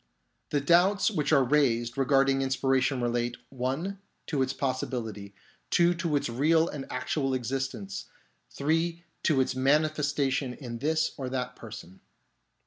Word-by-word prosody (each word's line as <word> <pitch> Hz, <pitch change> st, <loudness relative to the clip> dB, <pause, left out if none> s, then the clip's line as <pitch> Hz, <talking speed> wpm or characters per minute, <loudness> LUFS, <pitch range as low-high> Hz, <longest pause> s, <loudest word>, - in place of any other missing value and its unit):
The 145 Hz, -, +1 dB
doubts 180 Hz, +8 st, +4 dB
which 150 Hz, -7 st, -1 dB
are 140 Hz, -3 st, +5 dB
raised 120 Hz, -4 st, +2 dB
regarding 135 Hz, 0 st, +3 dB
inspiration 135 Hz, 0 st, +1 dB
relate 120 Hz, 0 st, -1 dB
(1) 135 Hz, +10 st, -3 dB, 0.3 s
to 145 Hz, -4 st, -1 dB
its 130 Hz, 0 st, +1 dB
possibility, 115 Hz, -7 st, -3 dB, 0.3 s
(2) 175 Hz, 0 st, +4 dB
to 170 Hz, -3 st, -1 dB
its 145 Hz, -, +1 dB
real 155 Hz, +7 st, +3 dB
and 140 Hz, -4 st, -6 dB
actual 135 Hz, -3 st, -1 dB
existence, 130 Hz, -6 st, -3 dB, 0.4 s
(3) 165 Hz, +4 st, -1 dB, 0.2 s
to 150 Hz, -4 st, +2 dB
its 130 Hz, 0 st, -1 dB
manifestation 140 Hz, -1 st, +1 dB
in 120 Hz, -4 st, -7 dB
this 160 Hz, +3 st, +1 dB
or 130 Hz, -3 st, -4 dB
that 125 Hz, -1 st, -3 dB
person. 110 Hz, -4 st, -10 dB
135 Hz, 135 wpm, -28 LUFS, 125-155 Hz, 0.4 s, are